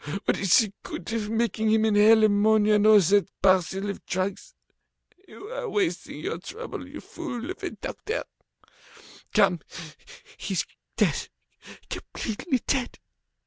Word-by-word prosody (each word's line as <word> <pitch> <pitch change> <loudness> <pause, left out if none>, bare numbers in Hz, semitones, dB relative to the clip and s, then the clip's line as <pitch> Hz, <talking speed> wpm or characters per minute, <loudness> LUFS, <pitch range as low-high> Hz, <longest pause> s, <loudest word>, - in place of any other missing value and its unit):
What - - +1
is 195 -3 +5
the 215 -5 +2
good 185 +5 -6
of 215 -2 -2
making 220 -1 0
him 220 0 +3
inhale 220 +1 +6
ammonia 215 0 +4
and 210 0 +4
all 215 -1 +8
that 200 +1 +3
parcel 190 +1 +2
of 200 - -5
drugs? 190 - -3 0.7
You 395 - -11
are - - -4
wasting 395 -3 -2
your - - -3
trouble, 475 +2 -7
you - - -9
fool 245 +7 -6
of 375 - -9
a - - -2
doctor! 445 +3 -5 1.1
Come, 195 -5 +3 0.8
he's - - -1 0.3
dead, - - +1 0.6
completely 245 +4 -3
dead. 260 -3 -1
215 Hz, 135 wpm, -26 LUFS, 200-240 Hz, 1.1 s, all